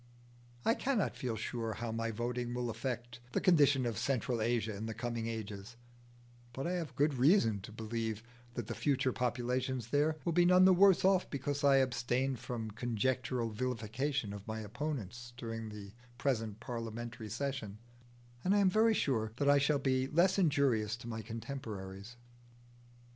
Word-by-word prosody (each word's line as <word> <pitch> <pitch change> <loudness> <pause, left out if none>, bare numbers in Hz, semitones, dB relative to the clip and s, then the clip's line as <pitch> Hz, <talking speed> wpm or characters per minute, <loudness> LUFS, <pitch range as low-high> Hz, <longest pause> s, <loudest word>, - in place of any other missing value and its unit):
I 225 - +5
cannot 250 -4 0
feel 120 -3 -3
sure 115 0 -3
how 115 +1 -4
my 115 0 -2
voting 120 +2 -2
will 120 -1 -1
affect 120 0 -4
the - - +2
condition 145 -7 +4
of 115 -4 -2
Central 125 -3 0
Asia 115 -2 0
in 110 +3 -5
the 110 - -4
coming 115 0 -3
ages, 110 0 -6 0.8
but 135 +3 -4
I 175 - 0
have 165 -7 -3
good 145 +2 +3
reason 125 - +4
to 100 - -9
believe 110 0 -3 0.3
that 120 - -3
the - - -4
future 135 -3 +1
populations 125 0 -1
there 150 +3 +2
will 170 - +1
be 175 +1 +5
none 180 +1 +6
the 190 - +7
worse 190 0 +6
off 190 -1 +3
because 140 +1 -3
I 140 -1 +6
abstain 130 0 +1
from 115 -2 -5
conjectural 120 +1 -1
vilification 120 +1 -2
of 100 +1 -9
my 110 0 -3
opponents 120 -1 -5
during 115 -2 -5
the 105 -2 -9 0.3
present 115 -5 -1
parliamentary 115 -1 -5
session, 120 -3 -3 0.7
and 195 +3 +3
I - - +4
am 195 -2 +4
very 220 +2 +4
sure 110 - 0
that 140 +2 +1
I 145 - +5
shall 145 +1 +3
be 130 -1 +1
less 180 +6 +3
injurious 135 - +2
to 120 0 -10
my 110 -1 -4
contemporaries. 110 -3 -7
120 Hz, 165 wpm, -34 LUFS, 110-140 Hz, 0.8 s, the